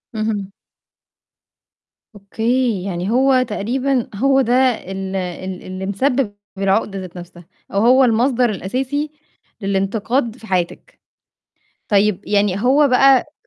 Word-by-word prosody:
اهم. 210 -3 -2 1.6
أوكي. 225 +1 -1
يعني 185 +1 -3
هو 260 +1 +4
تقريبًا 250 +3 -1
هو 270 +4 +3
ده 245 0 0 0.2
ال 195 -2 -6
ال 185 0 -5
اللي 185 +1 -6
مسبِّب 225 +2 0 0.2
العقدة 195 0 0
ذات 185 -1 -9
نَفْسها 175 -1 -11 0.3
أو 200 - +1
هو 260 +2 +6
المصدر 245 +1 +2
الأساسي 260 +9 -3 0.5
للإنتقاد 215 +5 -1
في 225 - -13
حياتِك. 185 - -3 0.9
طيب 205 -1 +2
يعني 200 -1 +1
هو 280 +3 +4
بقى 270 +2 +4
215 Hz, 110 wpm, -19 LUFS, 195-255 Hz, 1.6 s, هو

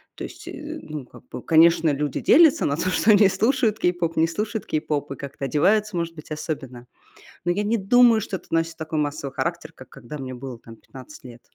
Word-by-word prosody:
то - - -8
есть, - - -10
э, 305 +2 -7
ну, 150 -4 -7
как - - -17
бы, - - -8
конечно, 165 0 +4
люди 145 0 -2
делятся 320 -3 +5
на 140 - 0
то, 185 - -1
что 215 +4 +3
они 205 -1 +6
слушают 220 +2 +1
кей-поп, 175 -3 -1
не 160 +1 +4
слушают 210 +5 -4
кей-поп 150 -2 -2
и - - -4
как-то 140 0 -6
одеваются, 200 - +1
может 170 -1 -3
быть, 155 -1 -12
особенно. 140 -6 -6 0.6
Но 175 - +2
я 200 +4 -1
не 225 +2 +1
думаю, 230 +3 +4
что 195 -2 -4
это - - -21
носит 165 0 0
такой 160 0 -5
массовый 145 -2 -3
характер, 170 -2 -3
как 130 - -14
когда 135 +6 -10
мне 130 -2 -6
было 125 -1 -8
там 115 -1 -14
15 135 +3 -13
лет. 120 -2 -12
165 Hz, 215 wpm, -23 LUFS, 145-205 Hz, 0.6 s, они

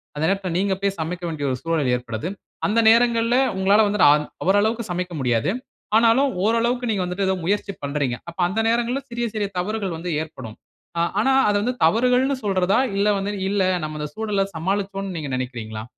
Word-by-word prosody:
அந்த 150 - -3
நேரத்தில 195 -2 -1
நீங்க 195 +1 +1
போய் 200 0 -1
சமைக்க 175 +3 -4
வேண்டிய 155 -3 -3
ஒரு 130 - -2
சூழல் 160 -6 0
ஏற்படுது. 115 +2 -5 0.4
அந்த 215 +3 +2
நேரங்கள்ல 230 0 +3 0.2
உங்களால 195 +3 +4
வந்து 205 0 -1
அந் 150 0 +1 0.2
அவரளவுக்கு 215 +5 +2
சமைக்க 180 0 -3
முடியாது. 120 +3 +1 0.4
ஆனாலும் 235 +5 +4
ஓரளவுக்கு 235 +3 +1
நீங்க 200 -4 0
வந்துட்டு 180 +2 -2
ஏதோ 190 - +2
முயற்சி 200 +2 0
பண்றீங்க. 140 -3 -1
அப்ப 170 - -14
அந்த 190 +5 -2
நேரங்கள்ல 240 +3 0
சிறிய, 240 0 -2
சிறிய 210 -2 -1
தவறுகள் 195 -1 -2
வந்து 175 +2 -5
ஏற்படும். 130 -8 -10 0.4
ஆ - - +3 0.2
ஆனா, 265 +5 +3 0.2
அத 205 - +1
வந்து 250 +3 0
தவறுகள்ன்னு 250 +9 +3
சொல்றதா? 190 0 +2 0.2
இல்ல 200 +1 +2
வந்து 195 +1 -2 0.2
இல்ல, 200 -1 +1 0.2
நம்ம 155 0 -4
அந்த 150 - -3
சூழல 210 -3 0
சமாளிச்சோன்னு 195 +2 -2
நீங்க 150 -3 -4
நினைக்கிறீங்களா? 115 -4 -5
195 Hz, 175 wpm, -22 LUFS, 160-220 Hz, 0.4 s, உங்களால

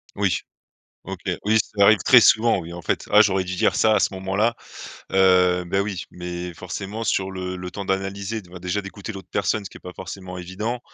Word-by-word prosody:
Oui. - - +1 0.7
OK. - - -6 0.3
Oui, 110 +1 +4
ça 100 0 0
arrive 110 -1 +6
très 125 - +8
souvent, 115 +1 +5
oui 85 0 -8
en 85 - -7
fait: - - -2
«Ah 105 +1 +8
j'aurais 95 -3 +2
dû 95 0 -4
dire - - +2
ça 110 -1 +4
à 105 - +3
ce - - +1
moment-là», 100 +5 0 0.6
heu, 90 -2 +4
bah, 95 +3 0
oui, 100 -3 -4
mais 90 0 -6
forcément 95 +6 -6
sur 95 -3 0
le 95 -1 -5
le 90 0 -7
temps 100 +1 -5
d'analyser, 95 +3 -2
d 90 - -19
bah, 90 - -10
déjà 90 +3 -2
d'écouter 100 +2 -8
l'autre 95 -2 -10
personne, 100 +1 -1
ce - - -6
qui - - -12
est - - -20
pas 90 - -8
forcément 95 -1 -8
évident, 100 +7 -4
95 Hz, 220 wpm, -23 LUFS, 90-105 Hz, 0.7 s, très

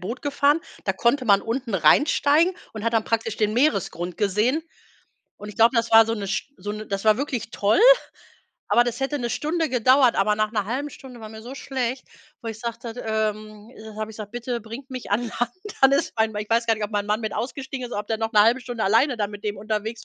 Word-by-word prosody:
Boot 225 +8 -5
gefahren, 285 +2 +2 0.2
da 195 - +1
konnte 240 +6 +1
man 200 -3 +5
unten 235 -2 -3
reinsteigen 290 - +4 0.2
und 215 -1 -7
hat 230 - 0
dann 225 -1 +2
praktisch 225 -1 -1
den 215 -1 +1
Meeresgrund 190 - 0
gesehen 215 - +1 0.7
und 210 +1 -9
ich - - -15
glaube, 230 +2 +5
das 230 0 +1
war 225 0 +7
so 225 - -1
'ne 205 -3 -5
St 215 +7 -3
so 205 +3 -5
'ne 215 0 -7
das 195 0 -4
war 215 0 +4
wirklich 260 -5 -3
toll, 205 0 +1 0.9
aber 240 - +4
das 240 +1 -4
hätte 280 +2 -1
'ne 240 -1 -3
Stunde 315 +4 -1
gedauert, 255 +1 +4
aber 210 +2 +2
nach 215 0 0
'ner 210 -3 -1
1/2 275 +6 -3
Stunde 250 -3 -12
war 215 - -9
mir 220 0 -10
so 255 +3 -8
schlecht, 260 -2 -3 0.4
wo 230 - -5
ich 225 - -6
sagte, 235 0 -5
d 245 - -8
ähm, 215 0 -3
äh, 220 0 -11
habe 215 0 -4
ich 215 - -12
gesagt: 210 0 -8
„Bitte 240 0 -4
bringt 235 +5 -10
mich 255 -5 -7
an 210 +4 +1
Land, 240 +2 -3 0.3
alles 270 +1 +4
fein.” 220 -1 +1
Weil 210 - -2
ich 210 - -14
weiß 230 +1 +2
gar 225 - +3
nicht, 215 -1 -4
ob 205 - -6
mein 205 -1 -1
Mann 210 +2 0
mit 220 - -3
ausgestiegen 265 +1 -4
ist 240 - -11
oder - - -1
ob 210 - -11
der 220 -1 -1
noch 225 +1 -2
'ne 210 - +6
1/2 235 +4 +3
Stunde 240 -3 -4
alleine 235 +7 +3
da 210 -2 0
mit 205 -1 -10
dem 210 -1 -3
unterwegs 215 +2 -4
225 Hz, 245 wpm, -23 LUFS, 210-250 Hz, 0.9 s, war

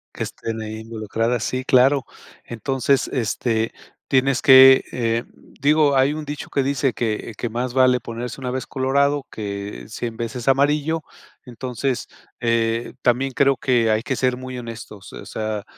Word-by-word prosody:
Que - - -4
estén 110 -1 -5
ahí 110 0 -6
involucradas, 115 +1 -2
sí, 130 +2 -2
claro. 130 +2 +4 0.4
Entonces, 135 +3 0
este, 115 -2 -1 0.3
tienes 130 -1 +2
que, 130 0 +8
eh, 115 -1 -1 0.4
digo, 145 0 +4
hay 135 +2 +4
un 155 0 -5
dicho 145 0 -7
que 140 - +1
dice 135 -1 0
que 115 -1 -3
que 120 - -3
más 120 +2 -3
vale 130 -1 +4
ponerse 120 +2 -6
1 125 -1 -3
vez 130 0 -3
colorado, 140 +1 +1
que 100 -1 -6
100 115 +1 -5
veces 115 +1 -5
amarillo, 145 +4 +2 0.4
entonces, 125 +1 -3 0.3
eh, 115 0 0
también 130 +2 +1
creo 140 +1 +3
que 120 -4 +2
hay 110 +1 +2
que 135 - -1
ser 125 0 0
muy 130 0 -7
honestos. 115 -4 -9
Eh, - - -10
o - - -14
sea, 110 -1 -4
125 Hz, 160 wpm, -22 LUFS, 115-135 Hz, 0.4 s, que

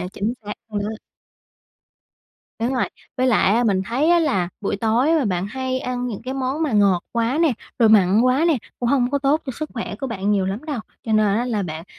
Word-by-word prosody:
à, 180 - -3
chính 210 +3 -2
xác 210 0 -5 0.2
luôn 205 -2 -3
đó. 205 - -3 1.7
Đúng 250 +3 0
rồi, 250 - +2 0.3
với 255 0 +2
lại 215 -4 +3
á 240 +2 +2
mình 195 -4 +2
thấy 255 +8 0
á 345 - +5
là 195 - +1
buổi 200 - -1
tối 225 +6 +1
mà 280 - 0
bạn 185 -1 -1
hay 260 +3 -3
ăn 250 -1 -3
những 225 -4 -5
cái 260 +2 -4
món 270 +4 -2
mà 290 -7 0
ngọt 200 -4 +3
quá 235 +4 0
nè, 325 -5 +4 0.3
rồi 230 -3 +5
mặn 205 -1 +5
quá 255 +5 +3
nè, 315 - +3 0.2
cũng 240 - -1
hông 255 -1 +2
có 285 - +1
tốt 280 +3 +2
cho 265 - -3
sức 305 +4 -6
khỏe 230 - -4
của 270 - -2
bạn 205 -4 -2
nhiều 195 -2 +1
lắm 200 +8 -4
đâu. 290 -7 -3 0.2
Cho 220 - -2
nên 215 0 +4
á 240 - 0
là 220 -5 -1
bạn 160 -1 -6
235 Hz, 240 wpm, -21 LUFS, 205-260 Hz, 1.7 s, á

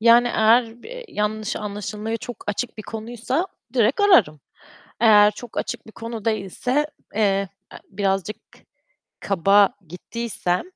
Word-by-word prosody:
yani, 235 +2 +6
eğer 230 +1 +3
b - - -9
yanlış 210 0 -2
anlaşılmaya 210 +2 -4
çok 245 +1 -8
açık 225 +3 -3
bir - - -5
konuysa 235 - -3 0.3
direkt 240 - +2
ararım, 230 - +5 0.6
Eğer 210 -2 +7
çok 235 +2 -8
açık - - -4
bir - - -12
konu 230 -1 -7
değilse, 225 +7 0 0.3
eee, 220 - +1 0.5
e, - - -7
birazcık 195 +1 -1 0.8
kaba 195 +1 +4
gittiysem, 180 0 -3
220 Hz, 125 wpm, -22 LUFS, 205-235 Hz, 0.8 s, Eğer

